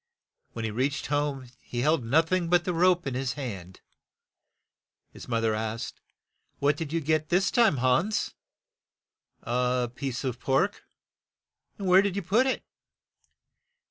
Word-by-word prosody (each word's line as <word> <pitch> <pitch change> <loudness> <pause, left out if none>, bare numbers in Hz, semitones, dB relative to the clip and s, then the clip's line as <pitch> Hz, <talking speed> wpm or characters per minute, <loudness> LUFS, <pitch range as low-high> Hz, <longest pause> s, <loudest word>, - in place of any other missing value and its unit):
When 115 -1 -4
he 110 - -2
reached 135 +6 -1
home 145 -3 -1
he 120 - -5
held 150 0 +2
noth 160 +8 +2
ing 185 -2 +1
but 175 0 +3
the 180 - 0
rope 180 +1 +3
in 135 - -2
his 130 0 -2
hand. 95 -10 -7 1.3
His - - -11
moth 115 -1 0
er 110 -1 +2
asked, 110 +1 -4 0.2
' - - -54
' - - -48
What 145 +1 +2
did 160 -4 -5
you 165 0 0
get 155 0 0
this 185 +2 +2
time, 230 - +4
Hans? 130 - +1 0.6
" - - -53
"A 125 0 0
piece 130 0 -4
of 125 -2 -3
pork. 140 +11 0 0.9
"Where 190 -2 +5
did 200 -2 -1
you 200 - -2
put 220 +9 +3
it?" 260 - -1
140 Hz, 160 wpm, -27 LUFS, 125-175 Hz, 1.3 s, Where